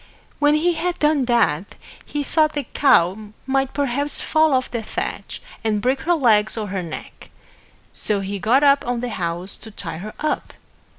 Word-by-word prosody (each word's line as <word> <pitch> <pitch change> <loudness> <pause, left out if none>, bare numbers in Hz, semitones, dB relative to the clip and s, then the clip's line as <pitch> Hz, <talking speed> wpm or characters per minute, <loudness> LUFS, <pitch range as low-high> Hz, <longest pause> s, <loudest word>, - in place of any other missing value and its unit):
When 295 0 +4
he 340 +3 +2
had 355 +2 -2
done 300 -3 +2
that, 215 -8 +1 0.3
he 295 -1 -3
thought 310 +1 +2
the 290 - -2
cow 215 -6 +2 0.2
might 270 0 0
perhaps 285 +1 -1
fall 315 -1 +3
off 255 0 -1
the 235 -2 -2
thatch 215 - -5 0.2
and 215 -2 +1
break 260 +5 0
her 345 +1 +2
legs 220 -7 +3
or 210 -2 -3
her 190 -1 -2
neck. 165 -3 -9 0.6
So 205 -2 -1
he 195 +1 -4
got 250 +8 +3
up 280 0 +5
on 245 -1 -1
the 245 - -3
house 175 -2 -3
to 220 - -12
tie 165 -6 -6
her 210 +4 -7
up. 305 - -2
245 Hz, 180 wpm, -21 LUFS, 205-290 Hz, 0.6 s, up